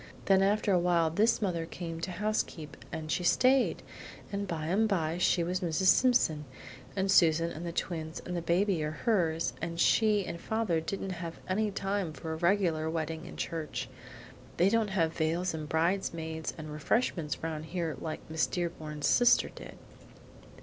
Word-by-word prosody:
Then 195 -1 +5
after 205 +1 +2
a 180 - +4
while 170 -2 +2
this 215 +6 +2
mother 170 -4 -1
came 165 -2 -6
to 180 - -3
housekeep, 175 -7 -2 0.2
and 160 -2 -5
she 180 - 0
stayed, 255 +7 +3 0.5
and 200 0 -3
by 165 -3 -3
and 205 +7 +2
by 170 -4 0
she 175 -1 +3
was 180 +2 -1
Mrs. 180 +1 +2
Simpson, 165 -12 +3 0.5
and 190 0 +1
Susan 165 -2 +4
and 170 +3 -6
the - - -3
twins 160 -2 -4
and 180 - -4
the 170 - -1
baby 175 0 +1
are 150 - -1
hers, 165 -2 0
and 170 0 -4
she 210 0 +3
and 170 - -6
father 220 -7 0
didn't 195 +3 -4
have 165 -1 -6 0.4
time 195 -5 -1
for 160 +3 -5
a - - -4
regular 170 -3 +1
wedding 160 0 -3
in - - -10
church. 160 -3 -4 0.7
They 180 +3 +4
don't 225 0 +2
have 165 -4 +1
veils 170 +3 0
and 155 -1 -5
bridesmaids 160 -1 -1
and 155 -1 -7
refreshments 160 -1 -1
round 155 -1 -3
here 165 -2 -3
like 160 -1 -6
Miss 160 -4 0
Dearborn's 155 -4 -4
sister 245 -1 +5
did." - - -11
170 Hz, 170 wpm, -30 LUFS, 160-195 Hz, 0.7 s, Then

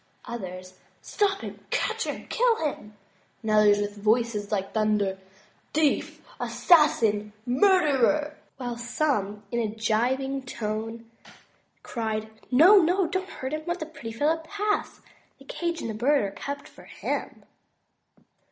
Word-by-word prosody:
Others, 185 -4 -7 0.2
Stop 395 -1 0
him, - - -7
catch - - 0
him, - - -5
kill 465 -8 +2
him," 215 -7 -5 0.5
and 220 - -1
others 210 -1 +6
with 205 0 -3
a - - -11
voice 220 -1 +1
like 195 -2 -2
thunder, 210 -3 +1 0.6
"Thief, 305 -2 +1
assassin, 220 - +3
murderer! 295 - +3
' - - -34
' - - -45
while 245 -2 -4
some 235 -5 -1
in 235 - 0
a 225 - +1
gibing 245 +6 0
tone, 225 -1 -5 0.8
cried, 220 -2 -3 0.2
No, 330 +11 +7
no; 365 +1 +4
do 375 +3 -1
not 380 +1 -10
hurt 260 -4 -5
him, 310 - -2
let 345 +1 -1
the 315 - -3
pretty 280 -8 -8
fellow 295 +8 +1
pass; 410 +6 -2 0.4
the - - -17
cage 340 -1 -3
and 220 -2 -4
bird 280 +1 +3
are 200 - -2
kept 280 +7 -6
for - - -16
him." - - -4
240 Hz, 145 wpm, -26 LUFS, 215-310 Hz, 0.8 s, No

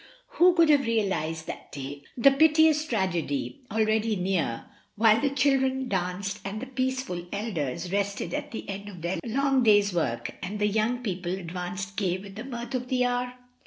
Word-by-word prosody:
Who 355 +1 +5
could 335 -2 +5
have 280 -4 +3
realised 165 -8 0
that - - -8
day 140 0 -6 0.2
the 275 +3 +7
piteous 310 +1 +4
tragedy, 220 - -1
already 220 0 +1
near, 180 -10 -1 0.3
while 220 +1 +5
the 285 - +2
children 265 -1 +1
danced 190 +1 -2
and 200 +2 -4
the 260 - -5
peaceful 260 -8 -2
elders 175 - -3
rested 200 -3 -1
at - - -3
the 225 - -7
end 200 +1 -6
of 180 -5 -11
their 175 +2 -1
long 270 +2 +2
day's 205 -4 +4
work, 120 -9 -1
and 195 +3 -4
the 210 - +1
young 220 +4 0
people 180 -5 -3
advanced 185 +2 -5
gay 185 -3 +1
with 195 +1 -10
the 220 +3 -7
mirth 240 -1 -6
of 250 -1 -2
the 250 -1 +1
hour? 245 0 0
210 Hz, 175 wpm, -27 LUFS, 185-255 Hz, 0.3 s, the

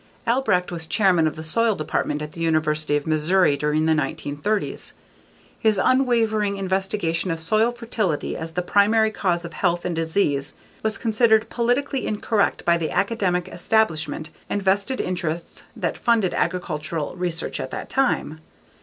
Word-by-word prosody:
Albrecht 230 -8 +1
was 165 -2 -4
chairman 180 -6 +3
of 155 - -3
the 160 - -7
Soil 220 +7 +1
Department 150 -1 -2
at 150 - -7
the 165 - -9
University 155 -2 +1
of 145 - -5
Missouri 160 +1 +3
during 150 +2 0
the 160 - +4
1930s. 155 +6 -2 0.7
His 215 -2 +2
unwavering 225 -4 +2
investigation 190 -2 -1
of 165 -1 -2
soil 215 +8 +2
fertility 225 -9 -2
as 160 0 -6
the 180 - -1
primary 215 +4 +3
cause 175 -5 -1
of 170 - -8
health 175 0 0
and 180 -2 -1
disease 160 -4 0 0.3
was 220 0 -1
considered 220 -1 +2
politically 250 +3 0
incorrect 210 0 0
by 170 0 +3
the 160 - -2
academic 195 -4 0
establishment 165 -6 0 0.2
and 205 - -1
vested 200 +7 +1
interests 170 -2 -3
that - - -3
funded 225 -6 +2
agricultural 165 -3 -2
research 175 -2 -2
at - - -4
that - - -6
time. 255 - 0
180 Hz, 150 wpm, -23 LUFS, 160-215 Hz, 0.7 s, the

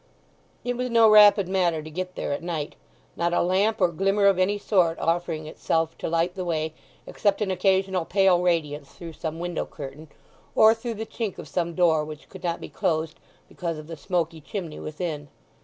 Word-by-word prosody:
It 245 0 -2
was 250 +1 -2
no 230 -1 +6
rapid 210 -2 +7
matter 175 -4 +1
to 155 - -8
get 185 +3 -5
there - - -3
at - - -4
night, 165 -4 -4 0.4
not 170 0 0
a - - +3
lamp 195 +5 +1
or 180 -3 +4
glimmer 195 +4 +1
of 195 -2 +4
any 195 +3 +2
sort 180 -5 +2
offering 165 -2 -1
itself 165 +1 -1
to - - -3
light 170 +2 +1
the 185 - -4
way, 160 -2 -2 0.3
except 200 -2 0
an 205 -3 0
occasional 190 -1 +1
pale 190 -1 +3
radiance 150 -5 0
through 170 -2 -9
some 160 +1 -5
window 175 -1 -3
curtain, 140 +4 -9 0.5
or 220 0 +7
through 230 0 -5
the 220 +1 -5
chink 220 -2 -4
of - - -8
some 170 -2 -2
door 165 -4 +3
which 150 -1 -9
could - - -12
not 170 -1 -1
be - - -7
closed 160 -1 -2 0.3
because 170 -2 -4
of 155 - -9
the 165 +1 -7
smoky 165 0 -2
chimney 160 +2 -6
within. 155 -2 -5
175 Hz, 195 wpm, -25 LUFS, 160-195 Hz, 0.5 s, rapid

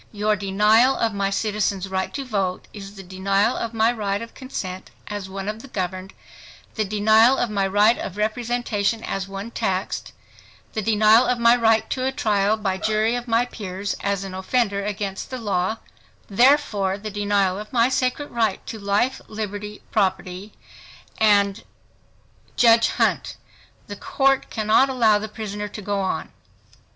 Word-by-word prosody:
Your 210 0 +1
denial 210 +6 +3
of 225 -2 0
my 200 -1 0
citizen's 200 -2 -1
right 190 0 -2
to 275 -1 -4
vote, 195 -6 -2
is 200 -1 -9
the 195 - -9
denial 195 +4 0
of 230 - -3
my 225 0 +2
right 205 -4 -2
of 230 +1 -9
consent 190 -8 -6 0.2
as 205 -2 -5
one 195 +1 -6
of 215 +1 -4
the 275 - -11
governed, 185 -4 -5 0.6
the 220 - 0
denial 220 +5 +4
of 235 - -1
my 195 -2 +1
right 210 +4 +3
of 190 - -6
representation 225 -1 -1
as 195 0 -3
one 195 +3 -7
taxed, 190 -5 -2 0.6
the 220 - -1
denial 220 +3 +4
of 250 - +1
my 235 0 +5
right 225 -2 +3
to 255 - -1
a 265 - +1
trial 215 -6 +1
by 190 -3 -2
jury 215 +2 +1
of 245 0 -5
my 230 +1 +2
peers 200 -4 -5
as 200 -1 -1
an 190 -1 -7
offender 200 +1 0
against 200 0 -4
law; 215 -4 -1 0.5
therefore, 210 -4 +3
the 215 +1 -7
denial 200 -2 0
of 210 0 -9
my 235 -1 +3
sacred 260 +2 -1
right 225 -4 -1
to 220 - -7
life, 205 +6 0
liberty, 210 -1 -6
property, 190 0 -1 0.7
and—— 200 -2 +3 0.9
JUDGE 230 -1 +5
HUNT—The - - -4
Court 270 -1 +1
cannot 220 +5 +3
allow 225 -5 +3
the 215 +1 -6
prisoner 210 -1 -5
to 210 - -9
go 200 0 -1
on. 190 -1 -2
210 Hz, 160 wpm, -23 LUFS, 195-230 Hz, 0.9 s, my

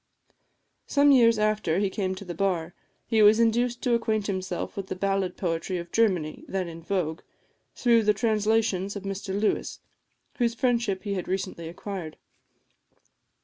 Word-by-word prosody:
Some 285 0 +4
years 230 -4 +6
after 215 -6 +1
he 200 -1 +1
came 190 -2 -2
to 200 - -9
the 175 - -5
bar, 175 -2 -1 0.3
he 220 -1 +2
was 210 +2 +7
induced 240 +1 +1
to 250 -3 +2
acquaint 220 -3 0
himself 185 -3 -3
with 195 -1 -5
the - - -4
ballad 195 -1 -1
poetry 175 +1 -2
of 170 0 -7
Germany, 185 -9 +1
then 190 -2 -2
in 165 0 -9
vogue, 165 -3 -2 0.5
through 235 -2 +4
the 210 -1 +3
translations 210 -3 +1
of 200 - -6
Mr 195 0 -3
Lewis, 215 - -1 0.6
whose 235 -1 +1
friendship 235 -6 0
he 205 -2 -2
had 185 -2 -3
recently 185 -3 -3
acquired. 175 -2 -7
200 Hz, 155 wpm, -26 LUFS, 185-225 Hz, 0.6 s, was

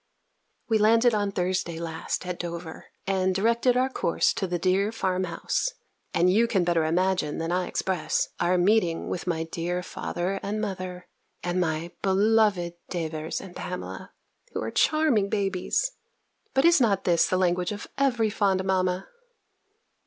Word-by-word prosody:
We 220 -2 +2
landed 230 +3 +5
on 205 -1 0
Thursday 180 -2 -1
last 165 +1 -4
at 180 -1 -4
Dover, 170 -1 -6 0.2
and 190 -1 +1
directed 235 +5 +2
our 255 +1 +3
course 255 -9 +1
to 190 - -2
the 175 0 -1
dear 190 +4 +1
farm 185 -4 -1
house; 180 - -2 0.4
and 180 +2 +3
you 230 +3 +4
can 195 -6 +1
better 170 -2 +2
imagine, 180 -2 +1
than 165 +1 -2
I 180 0 0
express, 185 -4 -1
our 180 +1 +2
meeting 180 -2 +2
with 180 - -4
my 165 -2 0
dear 175 +2 -3
father 180 +2 -3
and 205 +2 -3
mother, 185 -3 -5 0.4
and 175 +1 0
my 165 0 -1
beloved 200 -2 +3 0.2
Davers 160 -2 -3
and 180 -2 -11
Pamela, 180 0 -6 0.4
who - - -2
are - - -3
charming 295 -11 +2
babies. 200 - 0 0.6
But 270 +3 +4
is 340 -4 +6
not 200 -5 +2
this 170 -2 +3
the 185 - +1
language 180 0 +1
of 205 0 -5
every 240 -6 +2
fond 195 -3 +1
mamma? 185 -1 0
185 Hz, 155 wpm, -26 LUFS, 175-210 Hz, 0.6 s, is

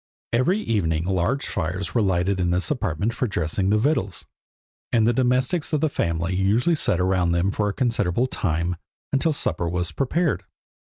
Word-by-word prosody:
Every 130 - +2
evening 85 - 0
large 95 +9 0
fires 95 +2 -2
were 120 - +2
lighted 95 0 +1
in 90 -1 +1
this 90 +7 +1
apartment 110 - -1
for 125 +1 -1
dressing 90 0 -1
the 105 - +4
victuals; 110 -6 0 0.7
and 115 -2 +3
the 120 - +3
domestics 130 +7 +1
of 150 - +2
the 155 - +2
family 85 - -1
usually 105 - +2
sat 120 - +1
around 90 -2 +2
them 85 +3 +1
for 105 0 0
a - - -3
considerable 115 -3 +1
time, 85 -7 -1 0.4
until 150 +4 +2
supper 85 - -1
was 90 0 -2
prepared. 140 - 0
100 Hz, 170 wpm, -23 LUFS, 90-125 Hz, 0.7 s, the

